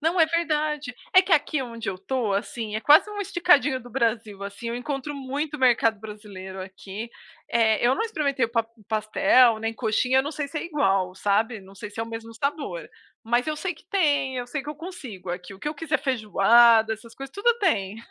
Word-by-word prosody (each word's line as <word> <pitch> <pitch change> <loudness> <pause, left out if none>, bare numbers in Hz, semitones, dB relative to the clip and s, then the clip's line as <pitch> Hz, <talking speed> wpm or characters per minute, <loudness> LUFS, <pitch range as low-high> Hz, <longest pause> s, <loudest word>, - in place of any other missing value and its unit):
Não, 330 +3 +1
é 320 - +6
verdade. 305 -5 -1 0.2
É 370 - +9
que 370 -1 -2
aqui 295 -1 +2
onde 230 -3 -6
eu 185 - -6
estou, 210 +2 -2
assim, 215 +2 -3
é 220 - -3
quase 305 - +6
uma 410 -1 -5
esticadinho 300 -8 +3
do 245 - -13
Brasil, 225 -4 -1
assim, 200 +4 -6
eu 235 - -3
encontro 275 +3 -4
muito 285 +2 -4
mercado 230 -4 +3
brasileiro 200 -3 -9
aqui. 195 +4 -8 0.4
Eh, 225 -1 +2
eu 255 +3 +4
não - - 0
experimentei 285 - 0
o - - -2
pa 230 -1 0 0.2
pastel, 220 +2 +4
nem 225 0 -3
coxinha, 250 +3 +1
eu - - +4
não 290 - -4
sei 295 -2 -4
se 305 - -9
é - - -1
igual, 195 - 0
sabe, 215 +3 +1
não 190 +1 -16
sei 210 +1 -8
se 210 - -14
é - - 0
o 225 - -5
mesmo 230 0 -7
sabor. 290 - -3 0.4
Mas 240 +5 +1
eu 305 - -2
sei 360 +1 -3
que - - -21
tem, 285 -9 +1
eu 245 0 -3
sei 275 +2 -4
que 295 - -10
eu 300 - -8
consigo 270 - -8
aqui 180 +2 -6
o 190 - -12
que - - -9
eu 305 - -4
quiser, 300 0 -1
feijoada, 225 -2 +4
essas 225 +1 -9
coisas, 270 +1 -9
tudo 445 +4 +3
tem. 215 - 0
245 Hz, 220 wpm, -25 LUFS, 220-295 Hz, 0.4 s, É